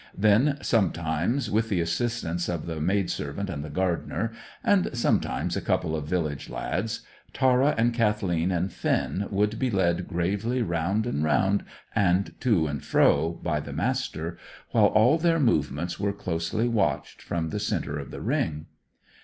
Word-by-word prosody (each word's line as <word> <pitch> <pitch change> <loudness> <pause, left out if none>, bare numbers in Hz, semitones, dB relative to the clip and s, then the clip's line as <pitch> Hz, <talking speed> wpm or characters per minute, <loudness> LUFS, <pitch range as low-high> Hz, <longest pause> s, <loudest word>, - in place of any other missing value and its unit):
Then, 110 +9 +4
sometimes 90 - 0
with 110 +2 +1
the 95 - +1
assistance 85 0 -1
of 85 -3 -3
the 80 -2 -4
maidservant 95 -1 -1
and 75 -3 -4
the 75 - -7
gardener, 90 +5 -1 0.3
and 200 -3 +3
sometimes 120 - 0
a - - -1
couple 80 - 0
of 75 -2 -4
village 80 -5 -2
lads, - - -3 0.3
Tara 130 +2 +3
and 120 +1 +3
Kathleen 100 -7 +1
and 90 0 -1
Finn 100 +1 -1
would 105 +2 0
be 130 - +1
led 90 -4 +1
gravely 100 +8 0
round 95 +4 0
and 75 -11 -1
round, 95 +6 +2 0.3
and 95 0 +2
to 105 -11 +2
and 70 -3 -3
fro, 80 +3 +3
by 75 -3 0
the 70 -1 -7
Master, 85 - -2 0.3
while - - +5
all 125 +9 +4
their 165 0 +3
movements 85 - 0
were 100 0 0
closely 90 +4 -1
watched 100 - -1
from 80 -2 -3
the - - -2
centre 75 +1 -2
of 70 - -7
the - - -7
ring. 75 0 -1
95 Hz, 155 wpm, -26 LUFS, 80-115 Hz, 0.3 s, while